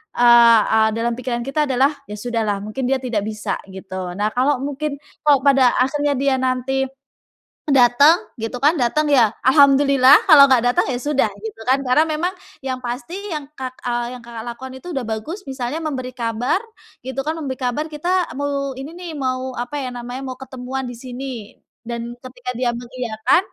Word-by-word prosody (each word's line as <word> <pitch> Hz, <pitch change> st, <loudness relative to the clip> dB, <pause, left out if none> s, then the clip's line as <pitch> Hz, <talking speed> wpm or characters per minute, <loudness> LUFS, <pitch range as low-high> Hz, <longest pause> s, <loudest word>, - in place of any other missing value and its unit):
eee, 235 Hz, -2 st, +6 dB
dalam 230 Hz, +1 st, -1 dB
pikiran 245 Hz, -1 st, -3 dB
kita 275 Hz, +5 st, 0 dB
adalah 270 Hz, +1 st, +2 dB
"ya 210 Hz, -, -8 dB
sudahlah 220 Hz, -4 st, -1 dB
mungkin 215 Hz, +5 st, -4 dB
dia 265 Hz, 0 st, 0 dB
tidak 230 Hz, -6 st, -2 dB
bisa," 215 Hz, -1 st, -3 dB, 0.2 s
gitu. 185 Hz, -1 st, -6 dB
Nah 205 Hz, +3 st, 0 dB
kalau 260 Hz, +3 st, +1 dB
mungkin 285 Hz, +1 st, -4 dB, 0.2 s
kalau 285 Hz, -3 st, +5 dB
pada 270 Hz, -3 st, +4 dB
akhirnya 290 Hz, +2 st, +1 dB
dia 275 Hz, 0 st, +1 dB
nanti, 260 Hz, +1 st, 0 dB, 0.8 s
datang 275 Hz, +4 st, +6 dB, 0.2 s
gitu 225 Hz, +3 st, -3 dB
kan, 290 Hz, +6 st, +3 dB
datang 300 Hz, +6 st, +1 dB
ya 235 Hz, -5 st, +5 dB, 0.2 s
Alhamdulillah 275 Hz, 0 st, +6 dB
kalau 285 Hz, -6 st, +8 dB
nggak 250 Hz, -3 st, +4 dB
datang -, -, +1 dB
ya 250 Hz, -, -1 dB
sudah, 275 Hz, -3 st, +1 dB
gitu 220 Hz, +1 st, -8 dB
kan. 260 Hz, -, +5 dB
Karena 255 Hz, +4 st, +4 dB
memang 320 Hz, +3 st, -1 dB, 0.3 s
yang 260 Hz, -1 st, -3 dB
pasti 250 Hz, +7 st, -5 dB, 0.2 s
yang, 305 Hz, -4 st, -4 dB
Kak 255 Hz, -3 st, -7 dB
eee, 240 Hz, +1 st, -2 dB
yang, -, -, -14 dB
Kakak, 235 Hz, -1 st, -7 dB
lakukan 260 Hz, +2 st, -7 dB
itu 355 Hz, -, -9 dB
udah 265 Hz, -3 st, -2 dB
bagus 225 Hz, -, -5 dB
misalnya 265 Hz, +1 st, -4 dB
memberi 280 Hz, -6 st, -4 dB
kabar 235 Hz, +5 st, 0 dB, 0.5 s
gitu 260 Hz, +1 st, -3 dB
kan, 315 Hz, +4 st, -3 dB
memberi 270 Hz, -5 st, -4 dB
kabar 255 Hz, +5 st, -1 dB
kita 345 Hz, +4 st, -1 dB
mau 280 Hz, -1 st, -2 dB
ini 270 Hz, +3 st, -7 dB
nih 355 Hz, -2 st, -7 dB
mau, 260 Hz, -2 st, -3 dB
apa 245 Hz, +4 st, -4 dB
ya -, -, -3 dB
namanya 245 Hz, +2 st, -6 dB
mau 260 Hz, -, -4 dB
ketemuan 260 Hz, 0 st, -5 dB
di 245 Hz, -, -8 dB
sini 260 Hz, +2 st, -6 dB, 0.5 s
dan 235 Hz, 0 st, -5 dB
ketika 250 Hz, -1 st, -7 dB
dia 250 Hz, -1 st, +1 dB
mengiyakan 240 Hz, 0 st, 0 dB
255 Hz, 175 wpm, -20 LUFS, 240-280 Hz, 0.8 s, kalau